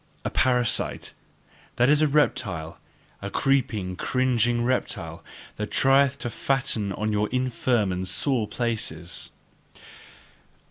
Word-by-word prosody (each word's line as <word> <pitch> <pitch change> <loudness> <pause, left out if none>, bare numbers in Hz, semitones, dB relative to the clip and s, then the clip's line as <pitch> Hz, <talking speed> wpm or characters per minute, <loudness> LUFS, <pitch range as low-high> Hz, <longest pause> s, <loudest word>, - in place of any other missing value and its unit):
A - - -1
parasite: 125 -3 +1 0.6
that 120 - +3
is 150 +2 +4
a 155 - +4
reptile, 95 - 0 0.4
a 100 - -4
creeping, 110 -7 0
cringing 120 +1 +1
reptile, 130 +1 -2 0.3
that 105 0 -3
trieth 135 +3 +3
to 120 - -3
fatten 115 -7 -1
on 110 +2 -2
your 105 0 0
infirm 125 -4 0
and 90 +1 -3
sore 125 0 +2
places. 115 -8 -3
120 Hz, 110 wpm, -25 LUFS, 105-130 Hz, 0.6 s, is